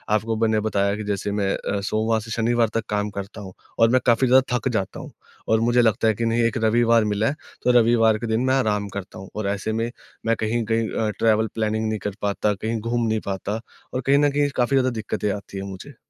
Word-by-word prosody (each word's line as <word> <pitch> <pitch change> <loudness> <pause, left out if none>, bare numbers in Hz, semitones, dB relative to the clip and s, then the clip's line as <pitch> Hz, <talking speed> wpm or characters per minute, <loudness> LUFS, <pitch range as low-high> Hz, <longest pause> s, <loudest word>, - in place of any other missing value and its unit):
आपको 110 +1 -1
मैंने 110 -1 +3
बताया 100 -1 +1
कि 110 - -5
जैसे 100 0 -2
मैं 100 -1 0
अ, 100 - -3
सोमवार 110 +2 0
से 115 +1 -9
शनिवार 115 0 +1
तक 115 -1 -1
काम 105 0 -1
करता 100 +2 -8
हूँ 95 -2 -9 0.3
और 115 - +6
मैं 130 +1 +3
काफ़ी 120 +2 +4
ज़्यादा 130 0 +4
थक 125 +3 -2
जाता 100 -3 -2
हूँ - - -9 0.4
और 110 - +3
मुझे 120 +1 +3
लगता 110 -1 +2
है 110 - +4
कि, 115 +3 -2
"नहीं, 115 +1 +1
एक 115 - +1
रविवार 115 0 +4
मिला 105 +1 0
है, 145 - -1 0.3
तो 125 - +4
रविवार 115 -2 +4
के 115 - -5
दिन 110 +2 +1
मैं 130 - +2
आराम 105 -5 0
करता 95 -1 -7
हूँ।" 95 - -10
और 105 -2 -2
ऐसे 100 +2 -2
में, 115 +1 -1 0.3
मैं 115 0 +2
कहीं-कहीं 115 0 0
अ, 110 -1 -1
ट्रैवल 110 0 +3
प्लानिंग 110 0 0
नहीं 110 -1 -2
कर 100 - -5
पाता, 105 +1 0
कहीं 110 +3 -3
घूम 115 +1 -1
नहीं 110 0 +1
पाता 100 +2 -3 0.3
और 130 - -1
कहीं 135 +2 +3
न 145 0 +3
कहीं 145 0 +1
काफ़ी 125 +2 +2
ज़्यादा 130 -1 +3
दिक्कतें 105 -1 -2
आती 100 -1 -7
हैं 95 - -4
मुझे। 100 +9 -9
110 Hz, 240 wpm, -23 LUFS, 105-120 Hz, 0.4 s, और